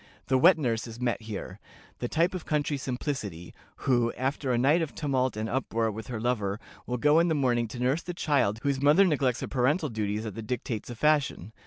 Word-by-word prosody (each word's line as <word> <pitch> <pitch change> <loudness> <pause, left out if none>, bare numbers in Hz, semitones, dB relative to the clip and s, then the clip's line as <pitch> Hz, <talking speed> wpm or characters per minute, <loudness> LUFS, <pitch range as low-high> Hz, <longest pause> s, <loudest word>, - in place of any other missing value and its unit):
The 130 - +4
wet 175 +5 +7
nurse 120 -6 -1
is 115 0 -9
met 120 -2 -1
here, 105 -2 -7 0.4
"the 120 - -2
type 165 +7 +1
of 185 - -4
country 150 -1 0
simplicity," 125 - -4 0.3
who, 120 -3 +3
after 135 +1 -2
a 120 - +2
night 145 +8 +3
of 160 - -4
tumult 130 -5 0
and 110 +1 -2
uproar 115 -2 -1
with 110 +1 -7
her 120 -3 -4
lover, 110 -4 -1 0.3
will 125 - -1
go 150 +6 +4
in 170 - +3
the 160 - +1
morning 120 -4 +1
to 120 +3 -8
nurse 130 +6 +1
the 180 -1 -6
child 140 -11 +1
whose 140 -2 0
mother 150 +8 +6
neglects 135 -7 +1
her - - -3
parental 145 +5 +1
duties 105 -1 -2
at 110 - -5
the 115 - -6
dictates 115 -1 -4
of 120 - -7
fashion. 145 - +1
125 Hz, 215 wpm, -28 LUFS, 115-145 Hz, 0.4 s, wet